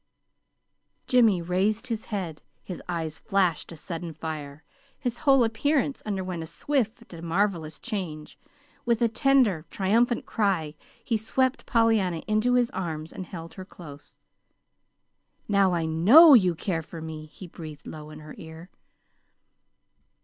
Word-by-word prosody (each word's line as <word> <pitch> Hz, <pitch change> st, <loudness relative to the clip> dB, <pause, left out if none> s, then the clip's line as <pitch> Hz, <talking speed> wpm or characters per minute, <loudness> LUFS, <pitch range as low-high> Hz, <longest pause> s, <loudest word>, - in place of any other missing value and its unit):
Jimmy 225 Hz, -8 st, +4 dB
raised 195 Hz, +7 st, 0 dB
his 230 Hz, -3 st, -4 dB
head. 180 Hz, -8 st, -5 dB, 0.2 s
His 180 Hz, -, -7 dB
eyes 160 Hz, -3 st, -3 dB
flashed 190 Hz, -7 st, 0 dB
a 165 Hz, -, -9 dB
sudden 165 Hz, 0 st, -6 dB
fire. 150 Hz, -2 st, -6 dB, 0.3 s
His 245 Hz, -3 st, -4 dB
whole 270 Hz, -3 st, +5 dB
appearance 275 Hz, +5 st, 0 dB
underwent 185 Hz, -4 st, -3 dB
a 160 Hz, -, -6 dB
swift 235 Hz, -, -2 dB
and 165 Hz, -, -9 dB
marvelous 170 Hz, -2 st, -1 dB
change. 180 Hz, -10 st, -5 dB, 0.5 s
With 235 Hz, -2 st, +1 dB
a -, -, +5 dB
tender, 230 Hz, -, +2 dB
triumphant 230 Hz, +5 st, +1 dB
cry 185 Hz, -8 st, 0 dB, 0.3 s
he 230 Hz, -, 0 dB
swept 260 Hz, +4 st, -1 dB
Pollyanna 220 Hz, -8 st, +2 dB
into 215 Hz, +4 st, +2 dB
his 245 Hz, -1 st, +2 dB
arms 160 Hz, -4 st, -5 dB
and 185 Hz, -, -7 dB
held 165 Hz, -2 st, -8 dB
her 190 Hz, -, -8 dB
close. 150 Hz, -6 st, -13 dB, 1.3 s
"Now 200 Hz, -3 st, +3 dB
I 165 Hz, -1 st, -1 dB
KNOW 220 Hz, -, +8 dB
you 185 Hz, -8 st, +5 dB
care 165 Hz, 0 st, -2 dB
for 165 Hz, +1 st, -10 dB
me!" 155 Hz, -1 st, -7 dB
he 185 Hz, -, -12 dB
breathed 160 Hz, -3 st, -10 dB
low 155 Hz, -1 st, -9 dB
in 155 Hz, 0 st, -11 dB
her 155 Hz, 0 st, -10 dB
ear. 160 Hz, +2 st, -11 dB
185 Hz, 140 wpm, -26 LUFS, 160-225 Hz, 1.3 s, KNOW